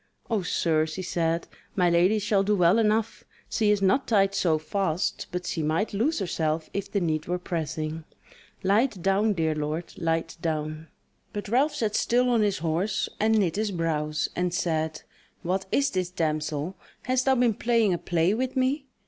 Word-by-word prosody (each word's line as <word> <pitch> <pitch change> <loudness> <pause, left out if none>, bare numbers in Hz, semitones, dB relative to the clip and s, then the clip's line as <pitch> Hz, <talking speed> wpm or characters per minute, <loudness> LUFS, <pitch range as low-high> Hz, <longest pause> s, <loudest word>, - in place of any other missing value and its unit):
"O 220 -3 +2
sir," 160 -3 +1
she 160 +4 -5
said; 165 -1 -1 0.3
"My 180 -2 +3
lady 175 +5 +4
shall 210 -1 +2
do 205 +2 +2
well 180 +3 +4
enough: 220 0 +1 0.2
she 215 -2 +1
is 205 -1 +2
not 200 +8 +3
tied 195 -3 +3
so 165 -5 +2
fast, 180 +2 -2
but 180 0 -4
she 165 - -2
might 160 +8 0
loose 250 +11 +1
herself 160 -5 -1
if 200 0 -4
the 200 - +1
need 155 -3 -1
were 180 +1 0
pressing. 160 -2 -4 0.6
Light 205 +2 +2
down, 200 +3 +3
dear 160 -4 0
lord, 155 +3 -3
light 165 0 -1
down!" 155 -1 -3 0.5
But 205 -1 -5
Ralph 270 +7 +2
sat 215 -2 -1
still 250 +1 +2
on 235 -2 +3
his 205 -2 +1
horse, 170 +6 -1
and 220 +1 +3
knit 185 -4 +1
his 215 0 0
brows, 155 -4 -1
and 180 0 0
said: 160 -4 -1 0.4
"What 190 +2 -1
is 280 0 +2
this, 185 -2 -1
damsel? 155 0 -2 0.3
hast 255 0 +1
thou 265 -1 +4
been 240 -2 +3
playing 230 -3 +2
a 175 - -2
play 175 +2 +1
with 255 +4 -2
me? 270 +2 0
185 Hz, 180 wpm, -26 LUFS, 160-215 Hz, 0.6 s, lady